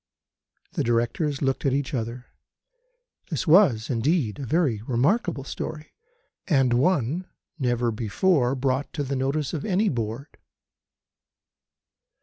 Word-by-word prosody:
The - - -1
Directors 120 +5 0
looked 135 -1 0
at 135 - +2
each 140 +2 -1
other. 120 0 -4 1.0
This - - -2
was, 155 - +5
indeed, 125 - 0
a 135 - -5
very 140 -8 +1
remarkable 145 - +1
story, 155 +2 -6 0.5
and 135 -7 +3
one 160 +4 +1 0.3
never 120 -2 +1
before 125 - +1
brought 130 +1 -1
to 145 - -2
the 140 0 -3
notice 135 +2 -1
of 155 - -3
any 205 +1 +1
Board. 115 +3 -4
135 Hz, 120 wpm, -25 LUFS, 120-155 Hz, 1.0 s, was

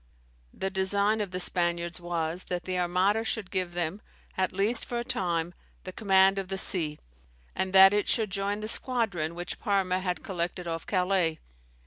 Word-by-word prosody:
The 190 - -4
design 200 +3 +1
of 205 - -3
the 180 0 -4
Spaniards 175 -1 -1
was, 170 0 -3
that 180 -1 -4
the 185 -1 -2
Armada 185 +5 +1
should 220 -4 -3
give 185 -2 -2
them, 175 +3 -2 0.3
at 185 -1 0
least 210 +5 +2
for 240 - -4
a 235 - -2
time, 170 -5 -2 0.3
the 185 - -6
command 195 -1 +3
of 195 - -5
the 195 0 -4
sea, 160 -6 +2 0.6
and 190 0 -1
that 195 +1 +8
it 205 0 0
should 220 -4 +1
join 200 +1 -2
the 215 - -4
squadron 215 -10 0
which 175 +1 -5
Parma 190 -3 0
had 180 -1 -3
collected, 175 -1 -4
off 165 -1 -4
Calais. 180 -4 +1
185 Hz, 175 wpm, -28 LUFS, 175-200 Hz, 0.6 s, that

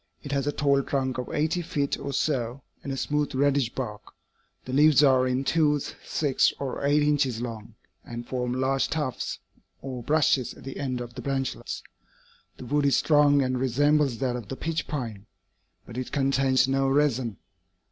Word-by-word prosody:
It 140 - -6
has 140 0 0
a - - +2
tall 140 -2 +2
trunk 130 -2 -2
of 125 - -5
eighty 160 +4 0
feet 145 -4 -1
or 140 0 -4
so, 130 -2 -1 0.2
and 140 - -4
a 135 - -3
smooth 150 0 -1
reddish 140 -2 +2
bark. 110 -6 -4 0.6
The 130 - -6
leaves 150 +1 +6
are 130 -2 +5
in 130 +1 0
twos, 150 -1 +1
six 145 -4 +2
or 140 0 -4
eight 145 +1 +3
inches 145 -5 +1
long, 115 -2 -6 0.3
and 120 0 -7
form 125 -1 -2
large 130 +2 +1
tufts 150 -6 -2 0.4
or 130 -2 -6
brushes 145 -1 +2
at - - -14
the 135 +1 -7
end 130 -3 -2
of 120 -1 -7
the - - -7
branchlets. 135 -2 -3 0.7
The 130 - -9
wood 145 +2 +1
is 140 - +3
strong 145 -2 +4
and 130 -1 -1
resembles 140 +1 +2
that 125 -1 -1
of 120 -4 -6
the 135 - -5
pitch 165 +3 -3
pine, 115 -8 -5 0.6
but 120 +1 -7
it 130 - -5
contains 135 -2 +2
no 135 0 +1
resin. 130 - +1
135 Hz, 180 wpm, -26 LUFS, 125-145 Hz, 0.7 s, leaves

